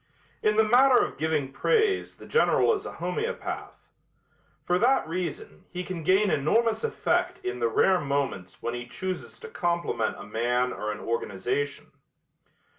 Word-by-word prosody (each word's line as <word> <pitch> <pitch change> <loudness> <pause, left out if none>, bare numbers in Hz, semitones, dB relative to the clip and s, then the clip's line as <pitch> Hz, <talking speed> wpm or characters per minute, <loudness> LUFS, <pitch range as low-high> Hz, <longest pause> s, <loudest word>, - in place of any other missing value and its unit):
In 210 0 +2
the 220 - +5
matter 250 +4 +6
of - - -9
giving 155 -3 0
praise 435 - +1
the - - -13
General 465 0 +3
is 410 0 -4
a - - -7
homeopath. 450 +2 -4 0.8
For 180 +1 +2
that 255 -3 +3
reason 175 +1 -5
he 180 0 -5
can 180 -2 -5
gain 190 +5 +3
enormous 220 - +2
effect 460 - 0
in 125 0 -3
the 120 - +2
rare 185 +10 +3
moments 140 - -3
when 120 - -2
he 120 0 -5
chooses 185 +8 -5
to 460 - -7
compliment 170 - -1
a - - -8
man 120 +4 0
or 105 0 -3
an 105 - -6
organization. 115 +5 -2
170 Hz, 155 wpm, -27 LUFS, -, 0.8 s, matter